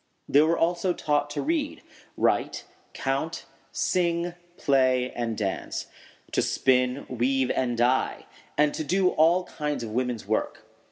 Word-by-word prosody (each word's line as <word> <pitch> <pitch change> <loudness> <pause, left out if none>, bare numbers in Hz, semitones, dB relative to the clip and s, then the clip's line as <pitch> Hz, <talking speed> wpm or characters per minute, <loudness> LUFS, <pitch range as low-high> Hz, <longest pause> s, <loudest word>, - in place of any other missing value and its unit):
] - - -46
They 145 - +5
were 160 +2 +3
also 175 +2 +1
taught 145 -3 0
to 145 0 -3
read, 305 -1 -1 0.3
write, - - +1 0.3
count, 135 +5 -2 0.3
sing, 170 -1 0 0.2
play, 130 -2 +2
and 115 -2 -3
dance; 100 -3 -3 0.5
to - - +2
spin, 125 +1 +1
weave, 130 +1 +1
and 120 -2 0
dye; 125 +2 +1 0.3
and 150 -1 +3
to - - -3
do 185 +4 +2
all 170 +3 +4
kinds 150 -6 -3
of 110 - -5
woman's 125 -1 -2
work. - - -2
140 Hz, 145 wpm, -26 LUFS, 125-170 Hz, 0.5 s, They